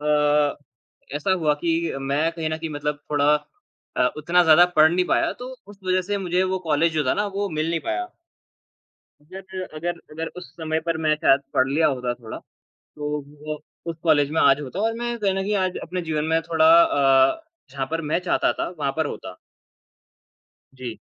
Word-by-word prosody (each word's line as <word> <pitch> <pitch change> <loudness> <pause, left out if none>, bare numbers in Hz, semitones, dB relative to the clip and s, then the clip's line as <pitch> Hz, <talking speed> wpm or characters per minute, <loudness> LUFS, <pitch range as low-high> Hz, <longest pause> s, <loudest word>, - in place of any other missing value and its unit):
अ, 150 -1 +2 0.6
ऐसा 190 +6 0
हुआ 155 -5 +2
कि 170 -1 +1 0.3
मैं 140 +4 0
कहीं 160 -2 -3
न 155 - -1
कहीं 160 -1 -5
मतलब 145 0 -3
थोड़ा 145 0 +4 0.6
अ, - - +3
उतना 170 +4 +3
ज़्यादा 160 +2 +7
पढ़ 155 +1 +7
नहीं 180 0 +2
पाया - - +1
तो 250 - -6 0.2
उस 205 -1 -14
वज़ह 185 0 +2
से 205 0 -1
मुझे 180 +2 +2
वो - - -1
कॉलेज 160 +2 +2
जो 150 -2 +1
था - - +3
ना 205 - 0
वो 200 0 -1
मिल 160 +2 0
नहीं 165 - -1
पाया। 360 +2 -2 1.1
अगर 190 +3 -8
अगर 170 +2 -3
अगर 160 +1 -4
उस 180 - -9
समय 160 -1 -2
पर 165 0 -2
मैं 155 - +4
शायद 135 -2 +4
पढ़ 130 +1 +3
लिया 155 +4 +2
होता 125 -3 -1
थोड़ा 115 -3 -9
तो 150 0 -11 0.4
वो 155 0 -3 0.3
उस 165 - -6
कॉलेज 150 -3 +3
में 160 - +1
आज 140 +1 +5
होता 145 +8 -5
और 225 +1 +1
मैं 240 0 -2
कहीं 195 -3 +1
न 195 - -1
कहीं 210 +2 -1
आज 185 -1 -2
अपने 180 +2 -4
जीवन 155 -2 -2
में 165 - +3
थोड़ा 160 -1 +2 0.2
अ, 135 - +3 0.3
जहाँ 135 -1 -3
पर 165 0 -1
मैं - - +3
चाहता 180 - +1
था - - -3
वहाँ 140 -2 -1
पर 160 -2 +1
होता। - - -7 1.4
जी। 125 -3 -7
160 Hz, 195 wpm, -23 LUFS, 145-180 Hz, 1.4 s, ज़्यादा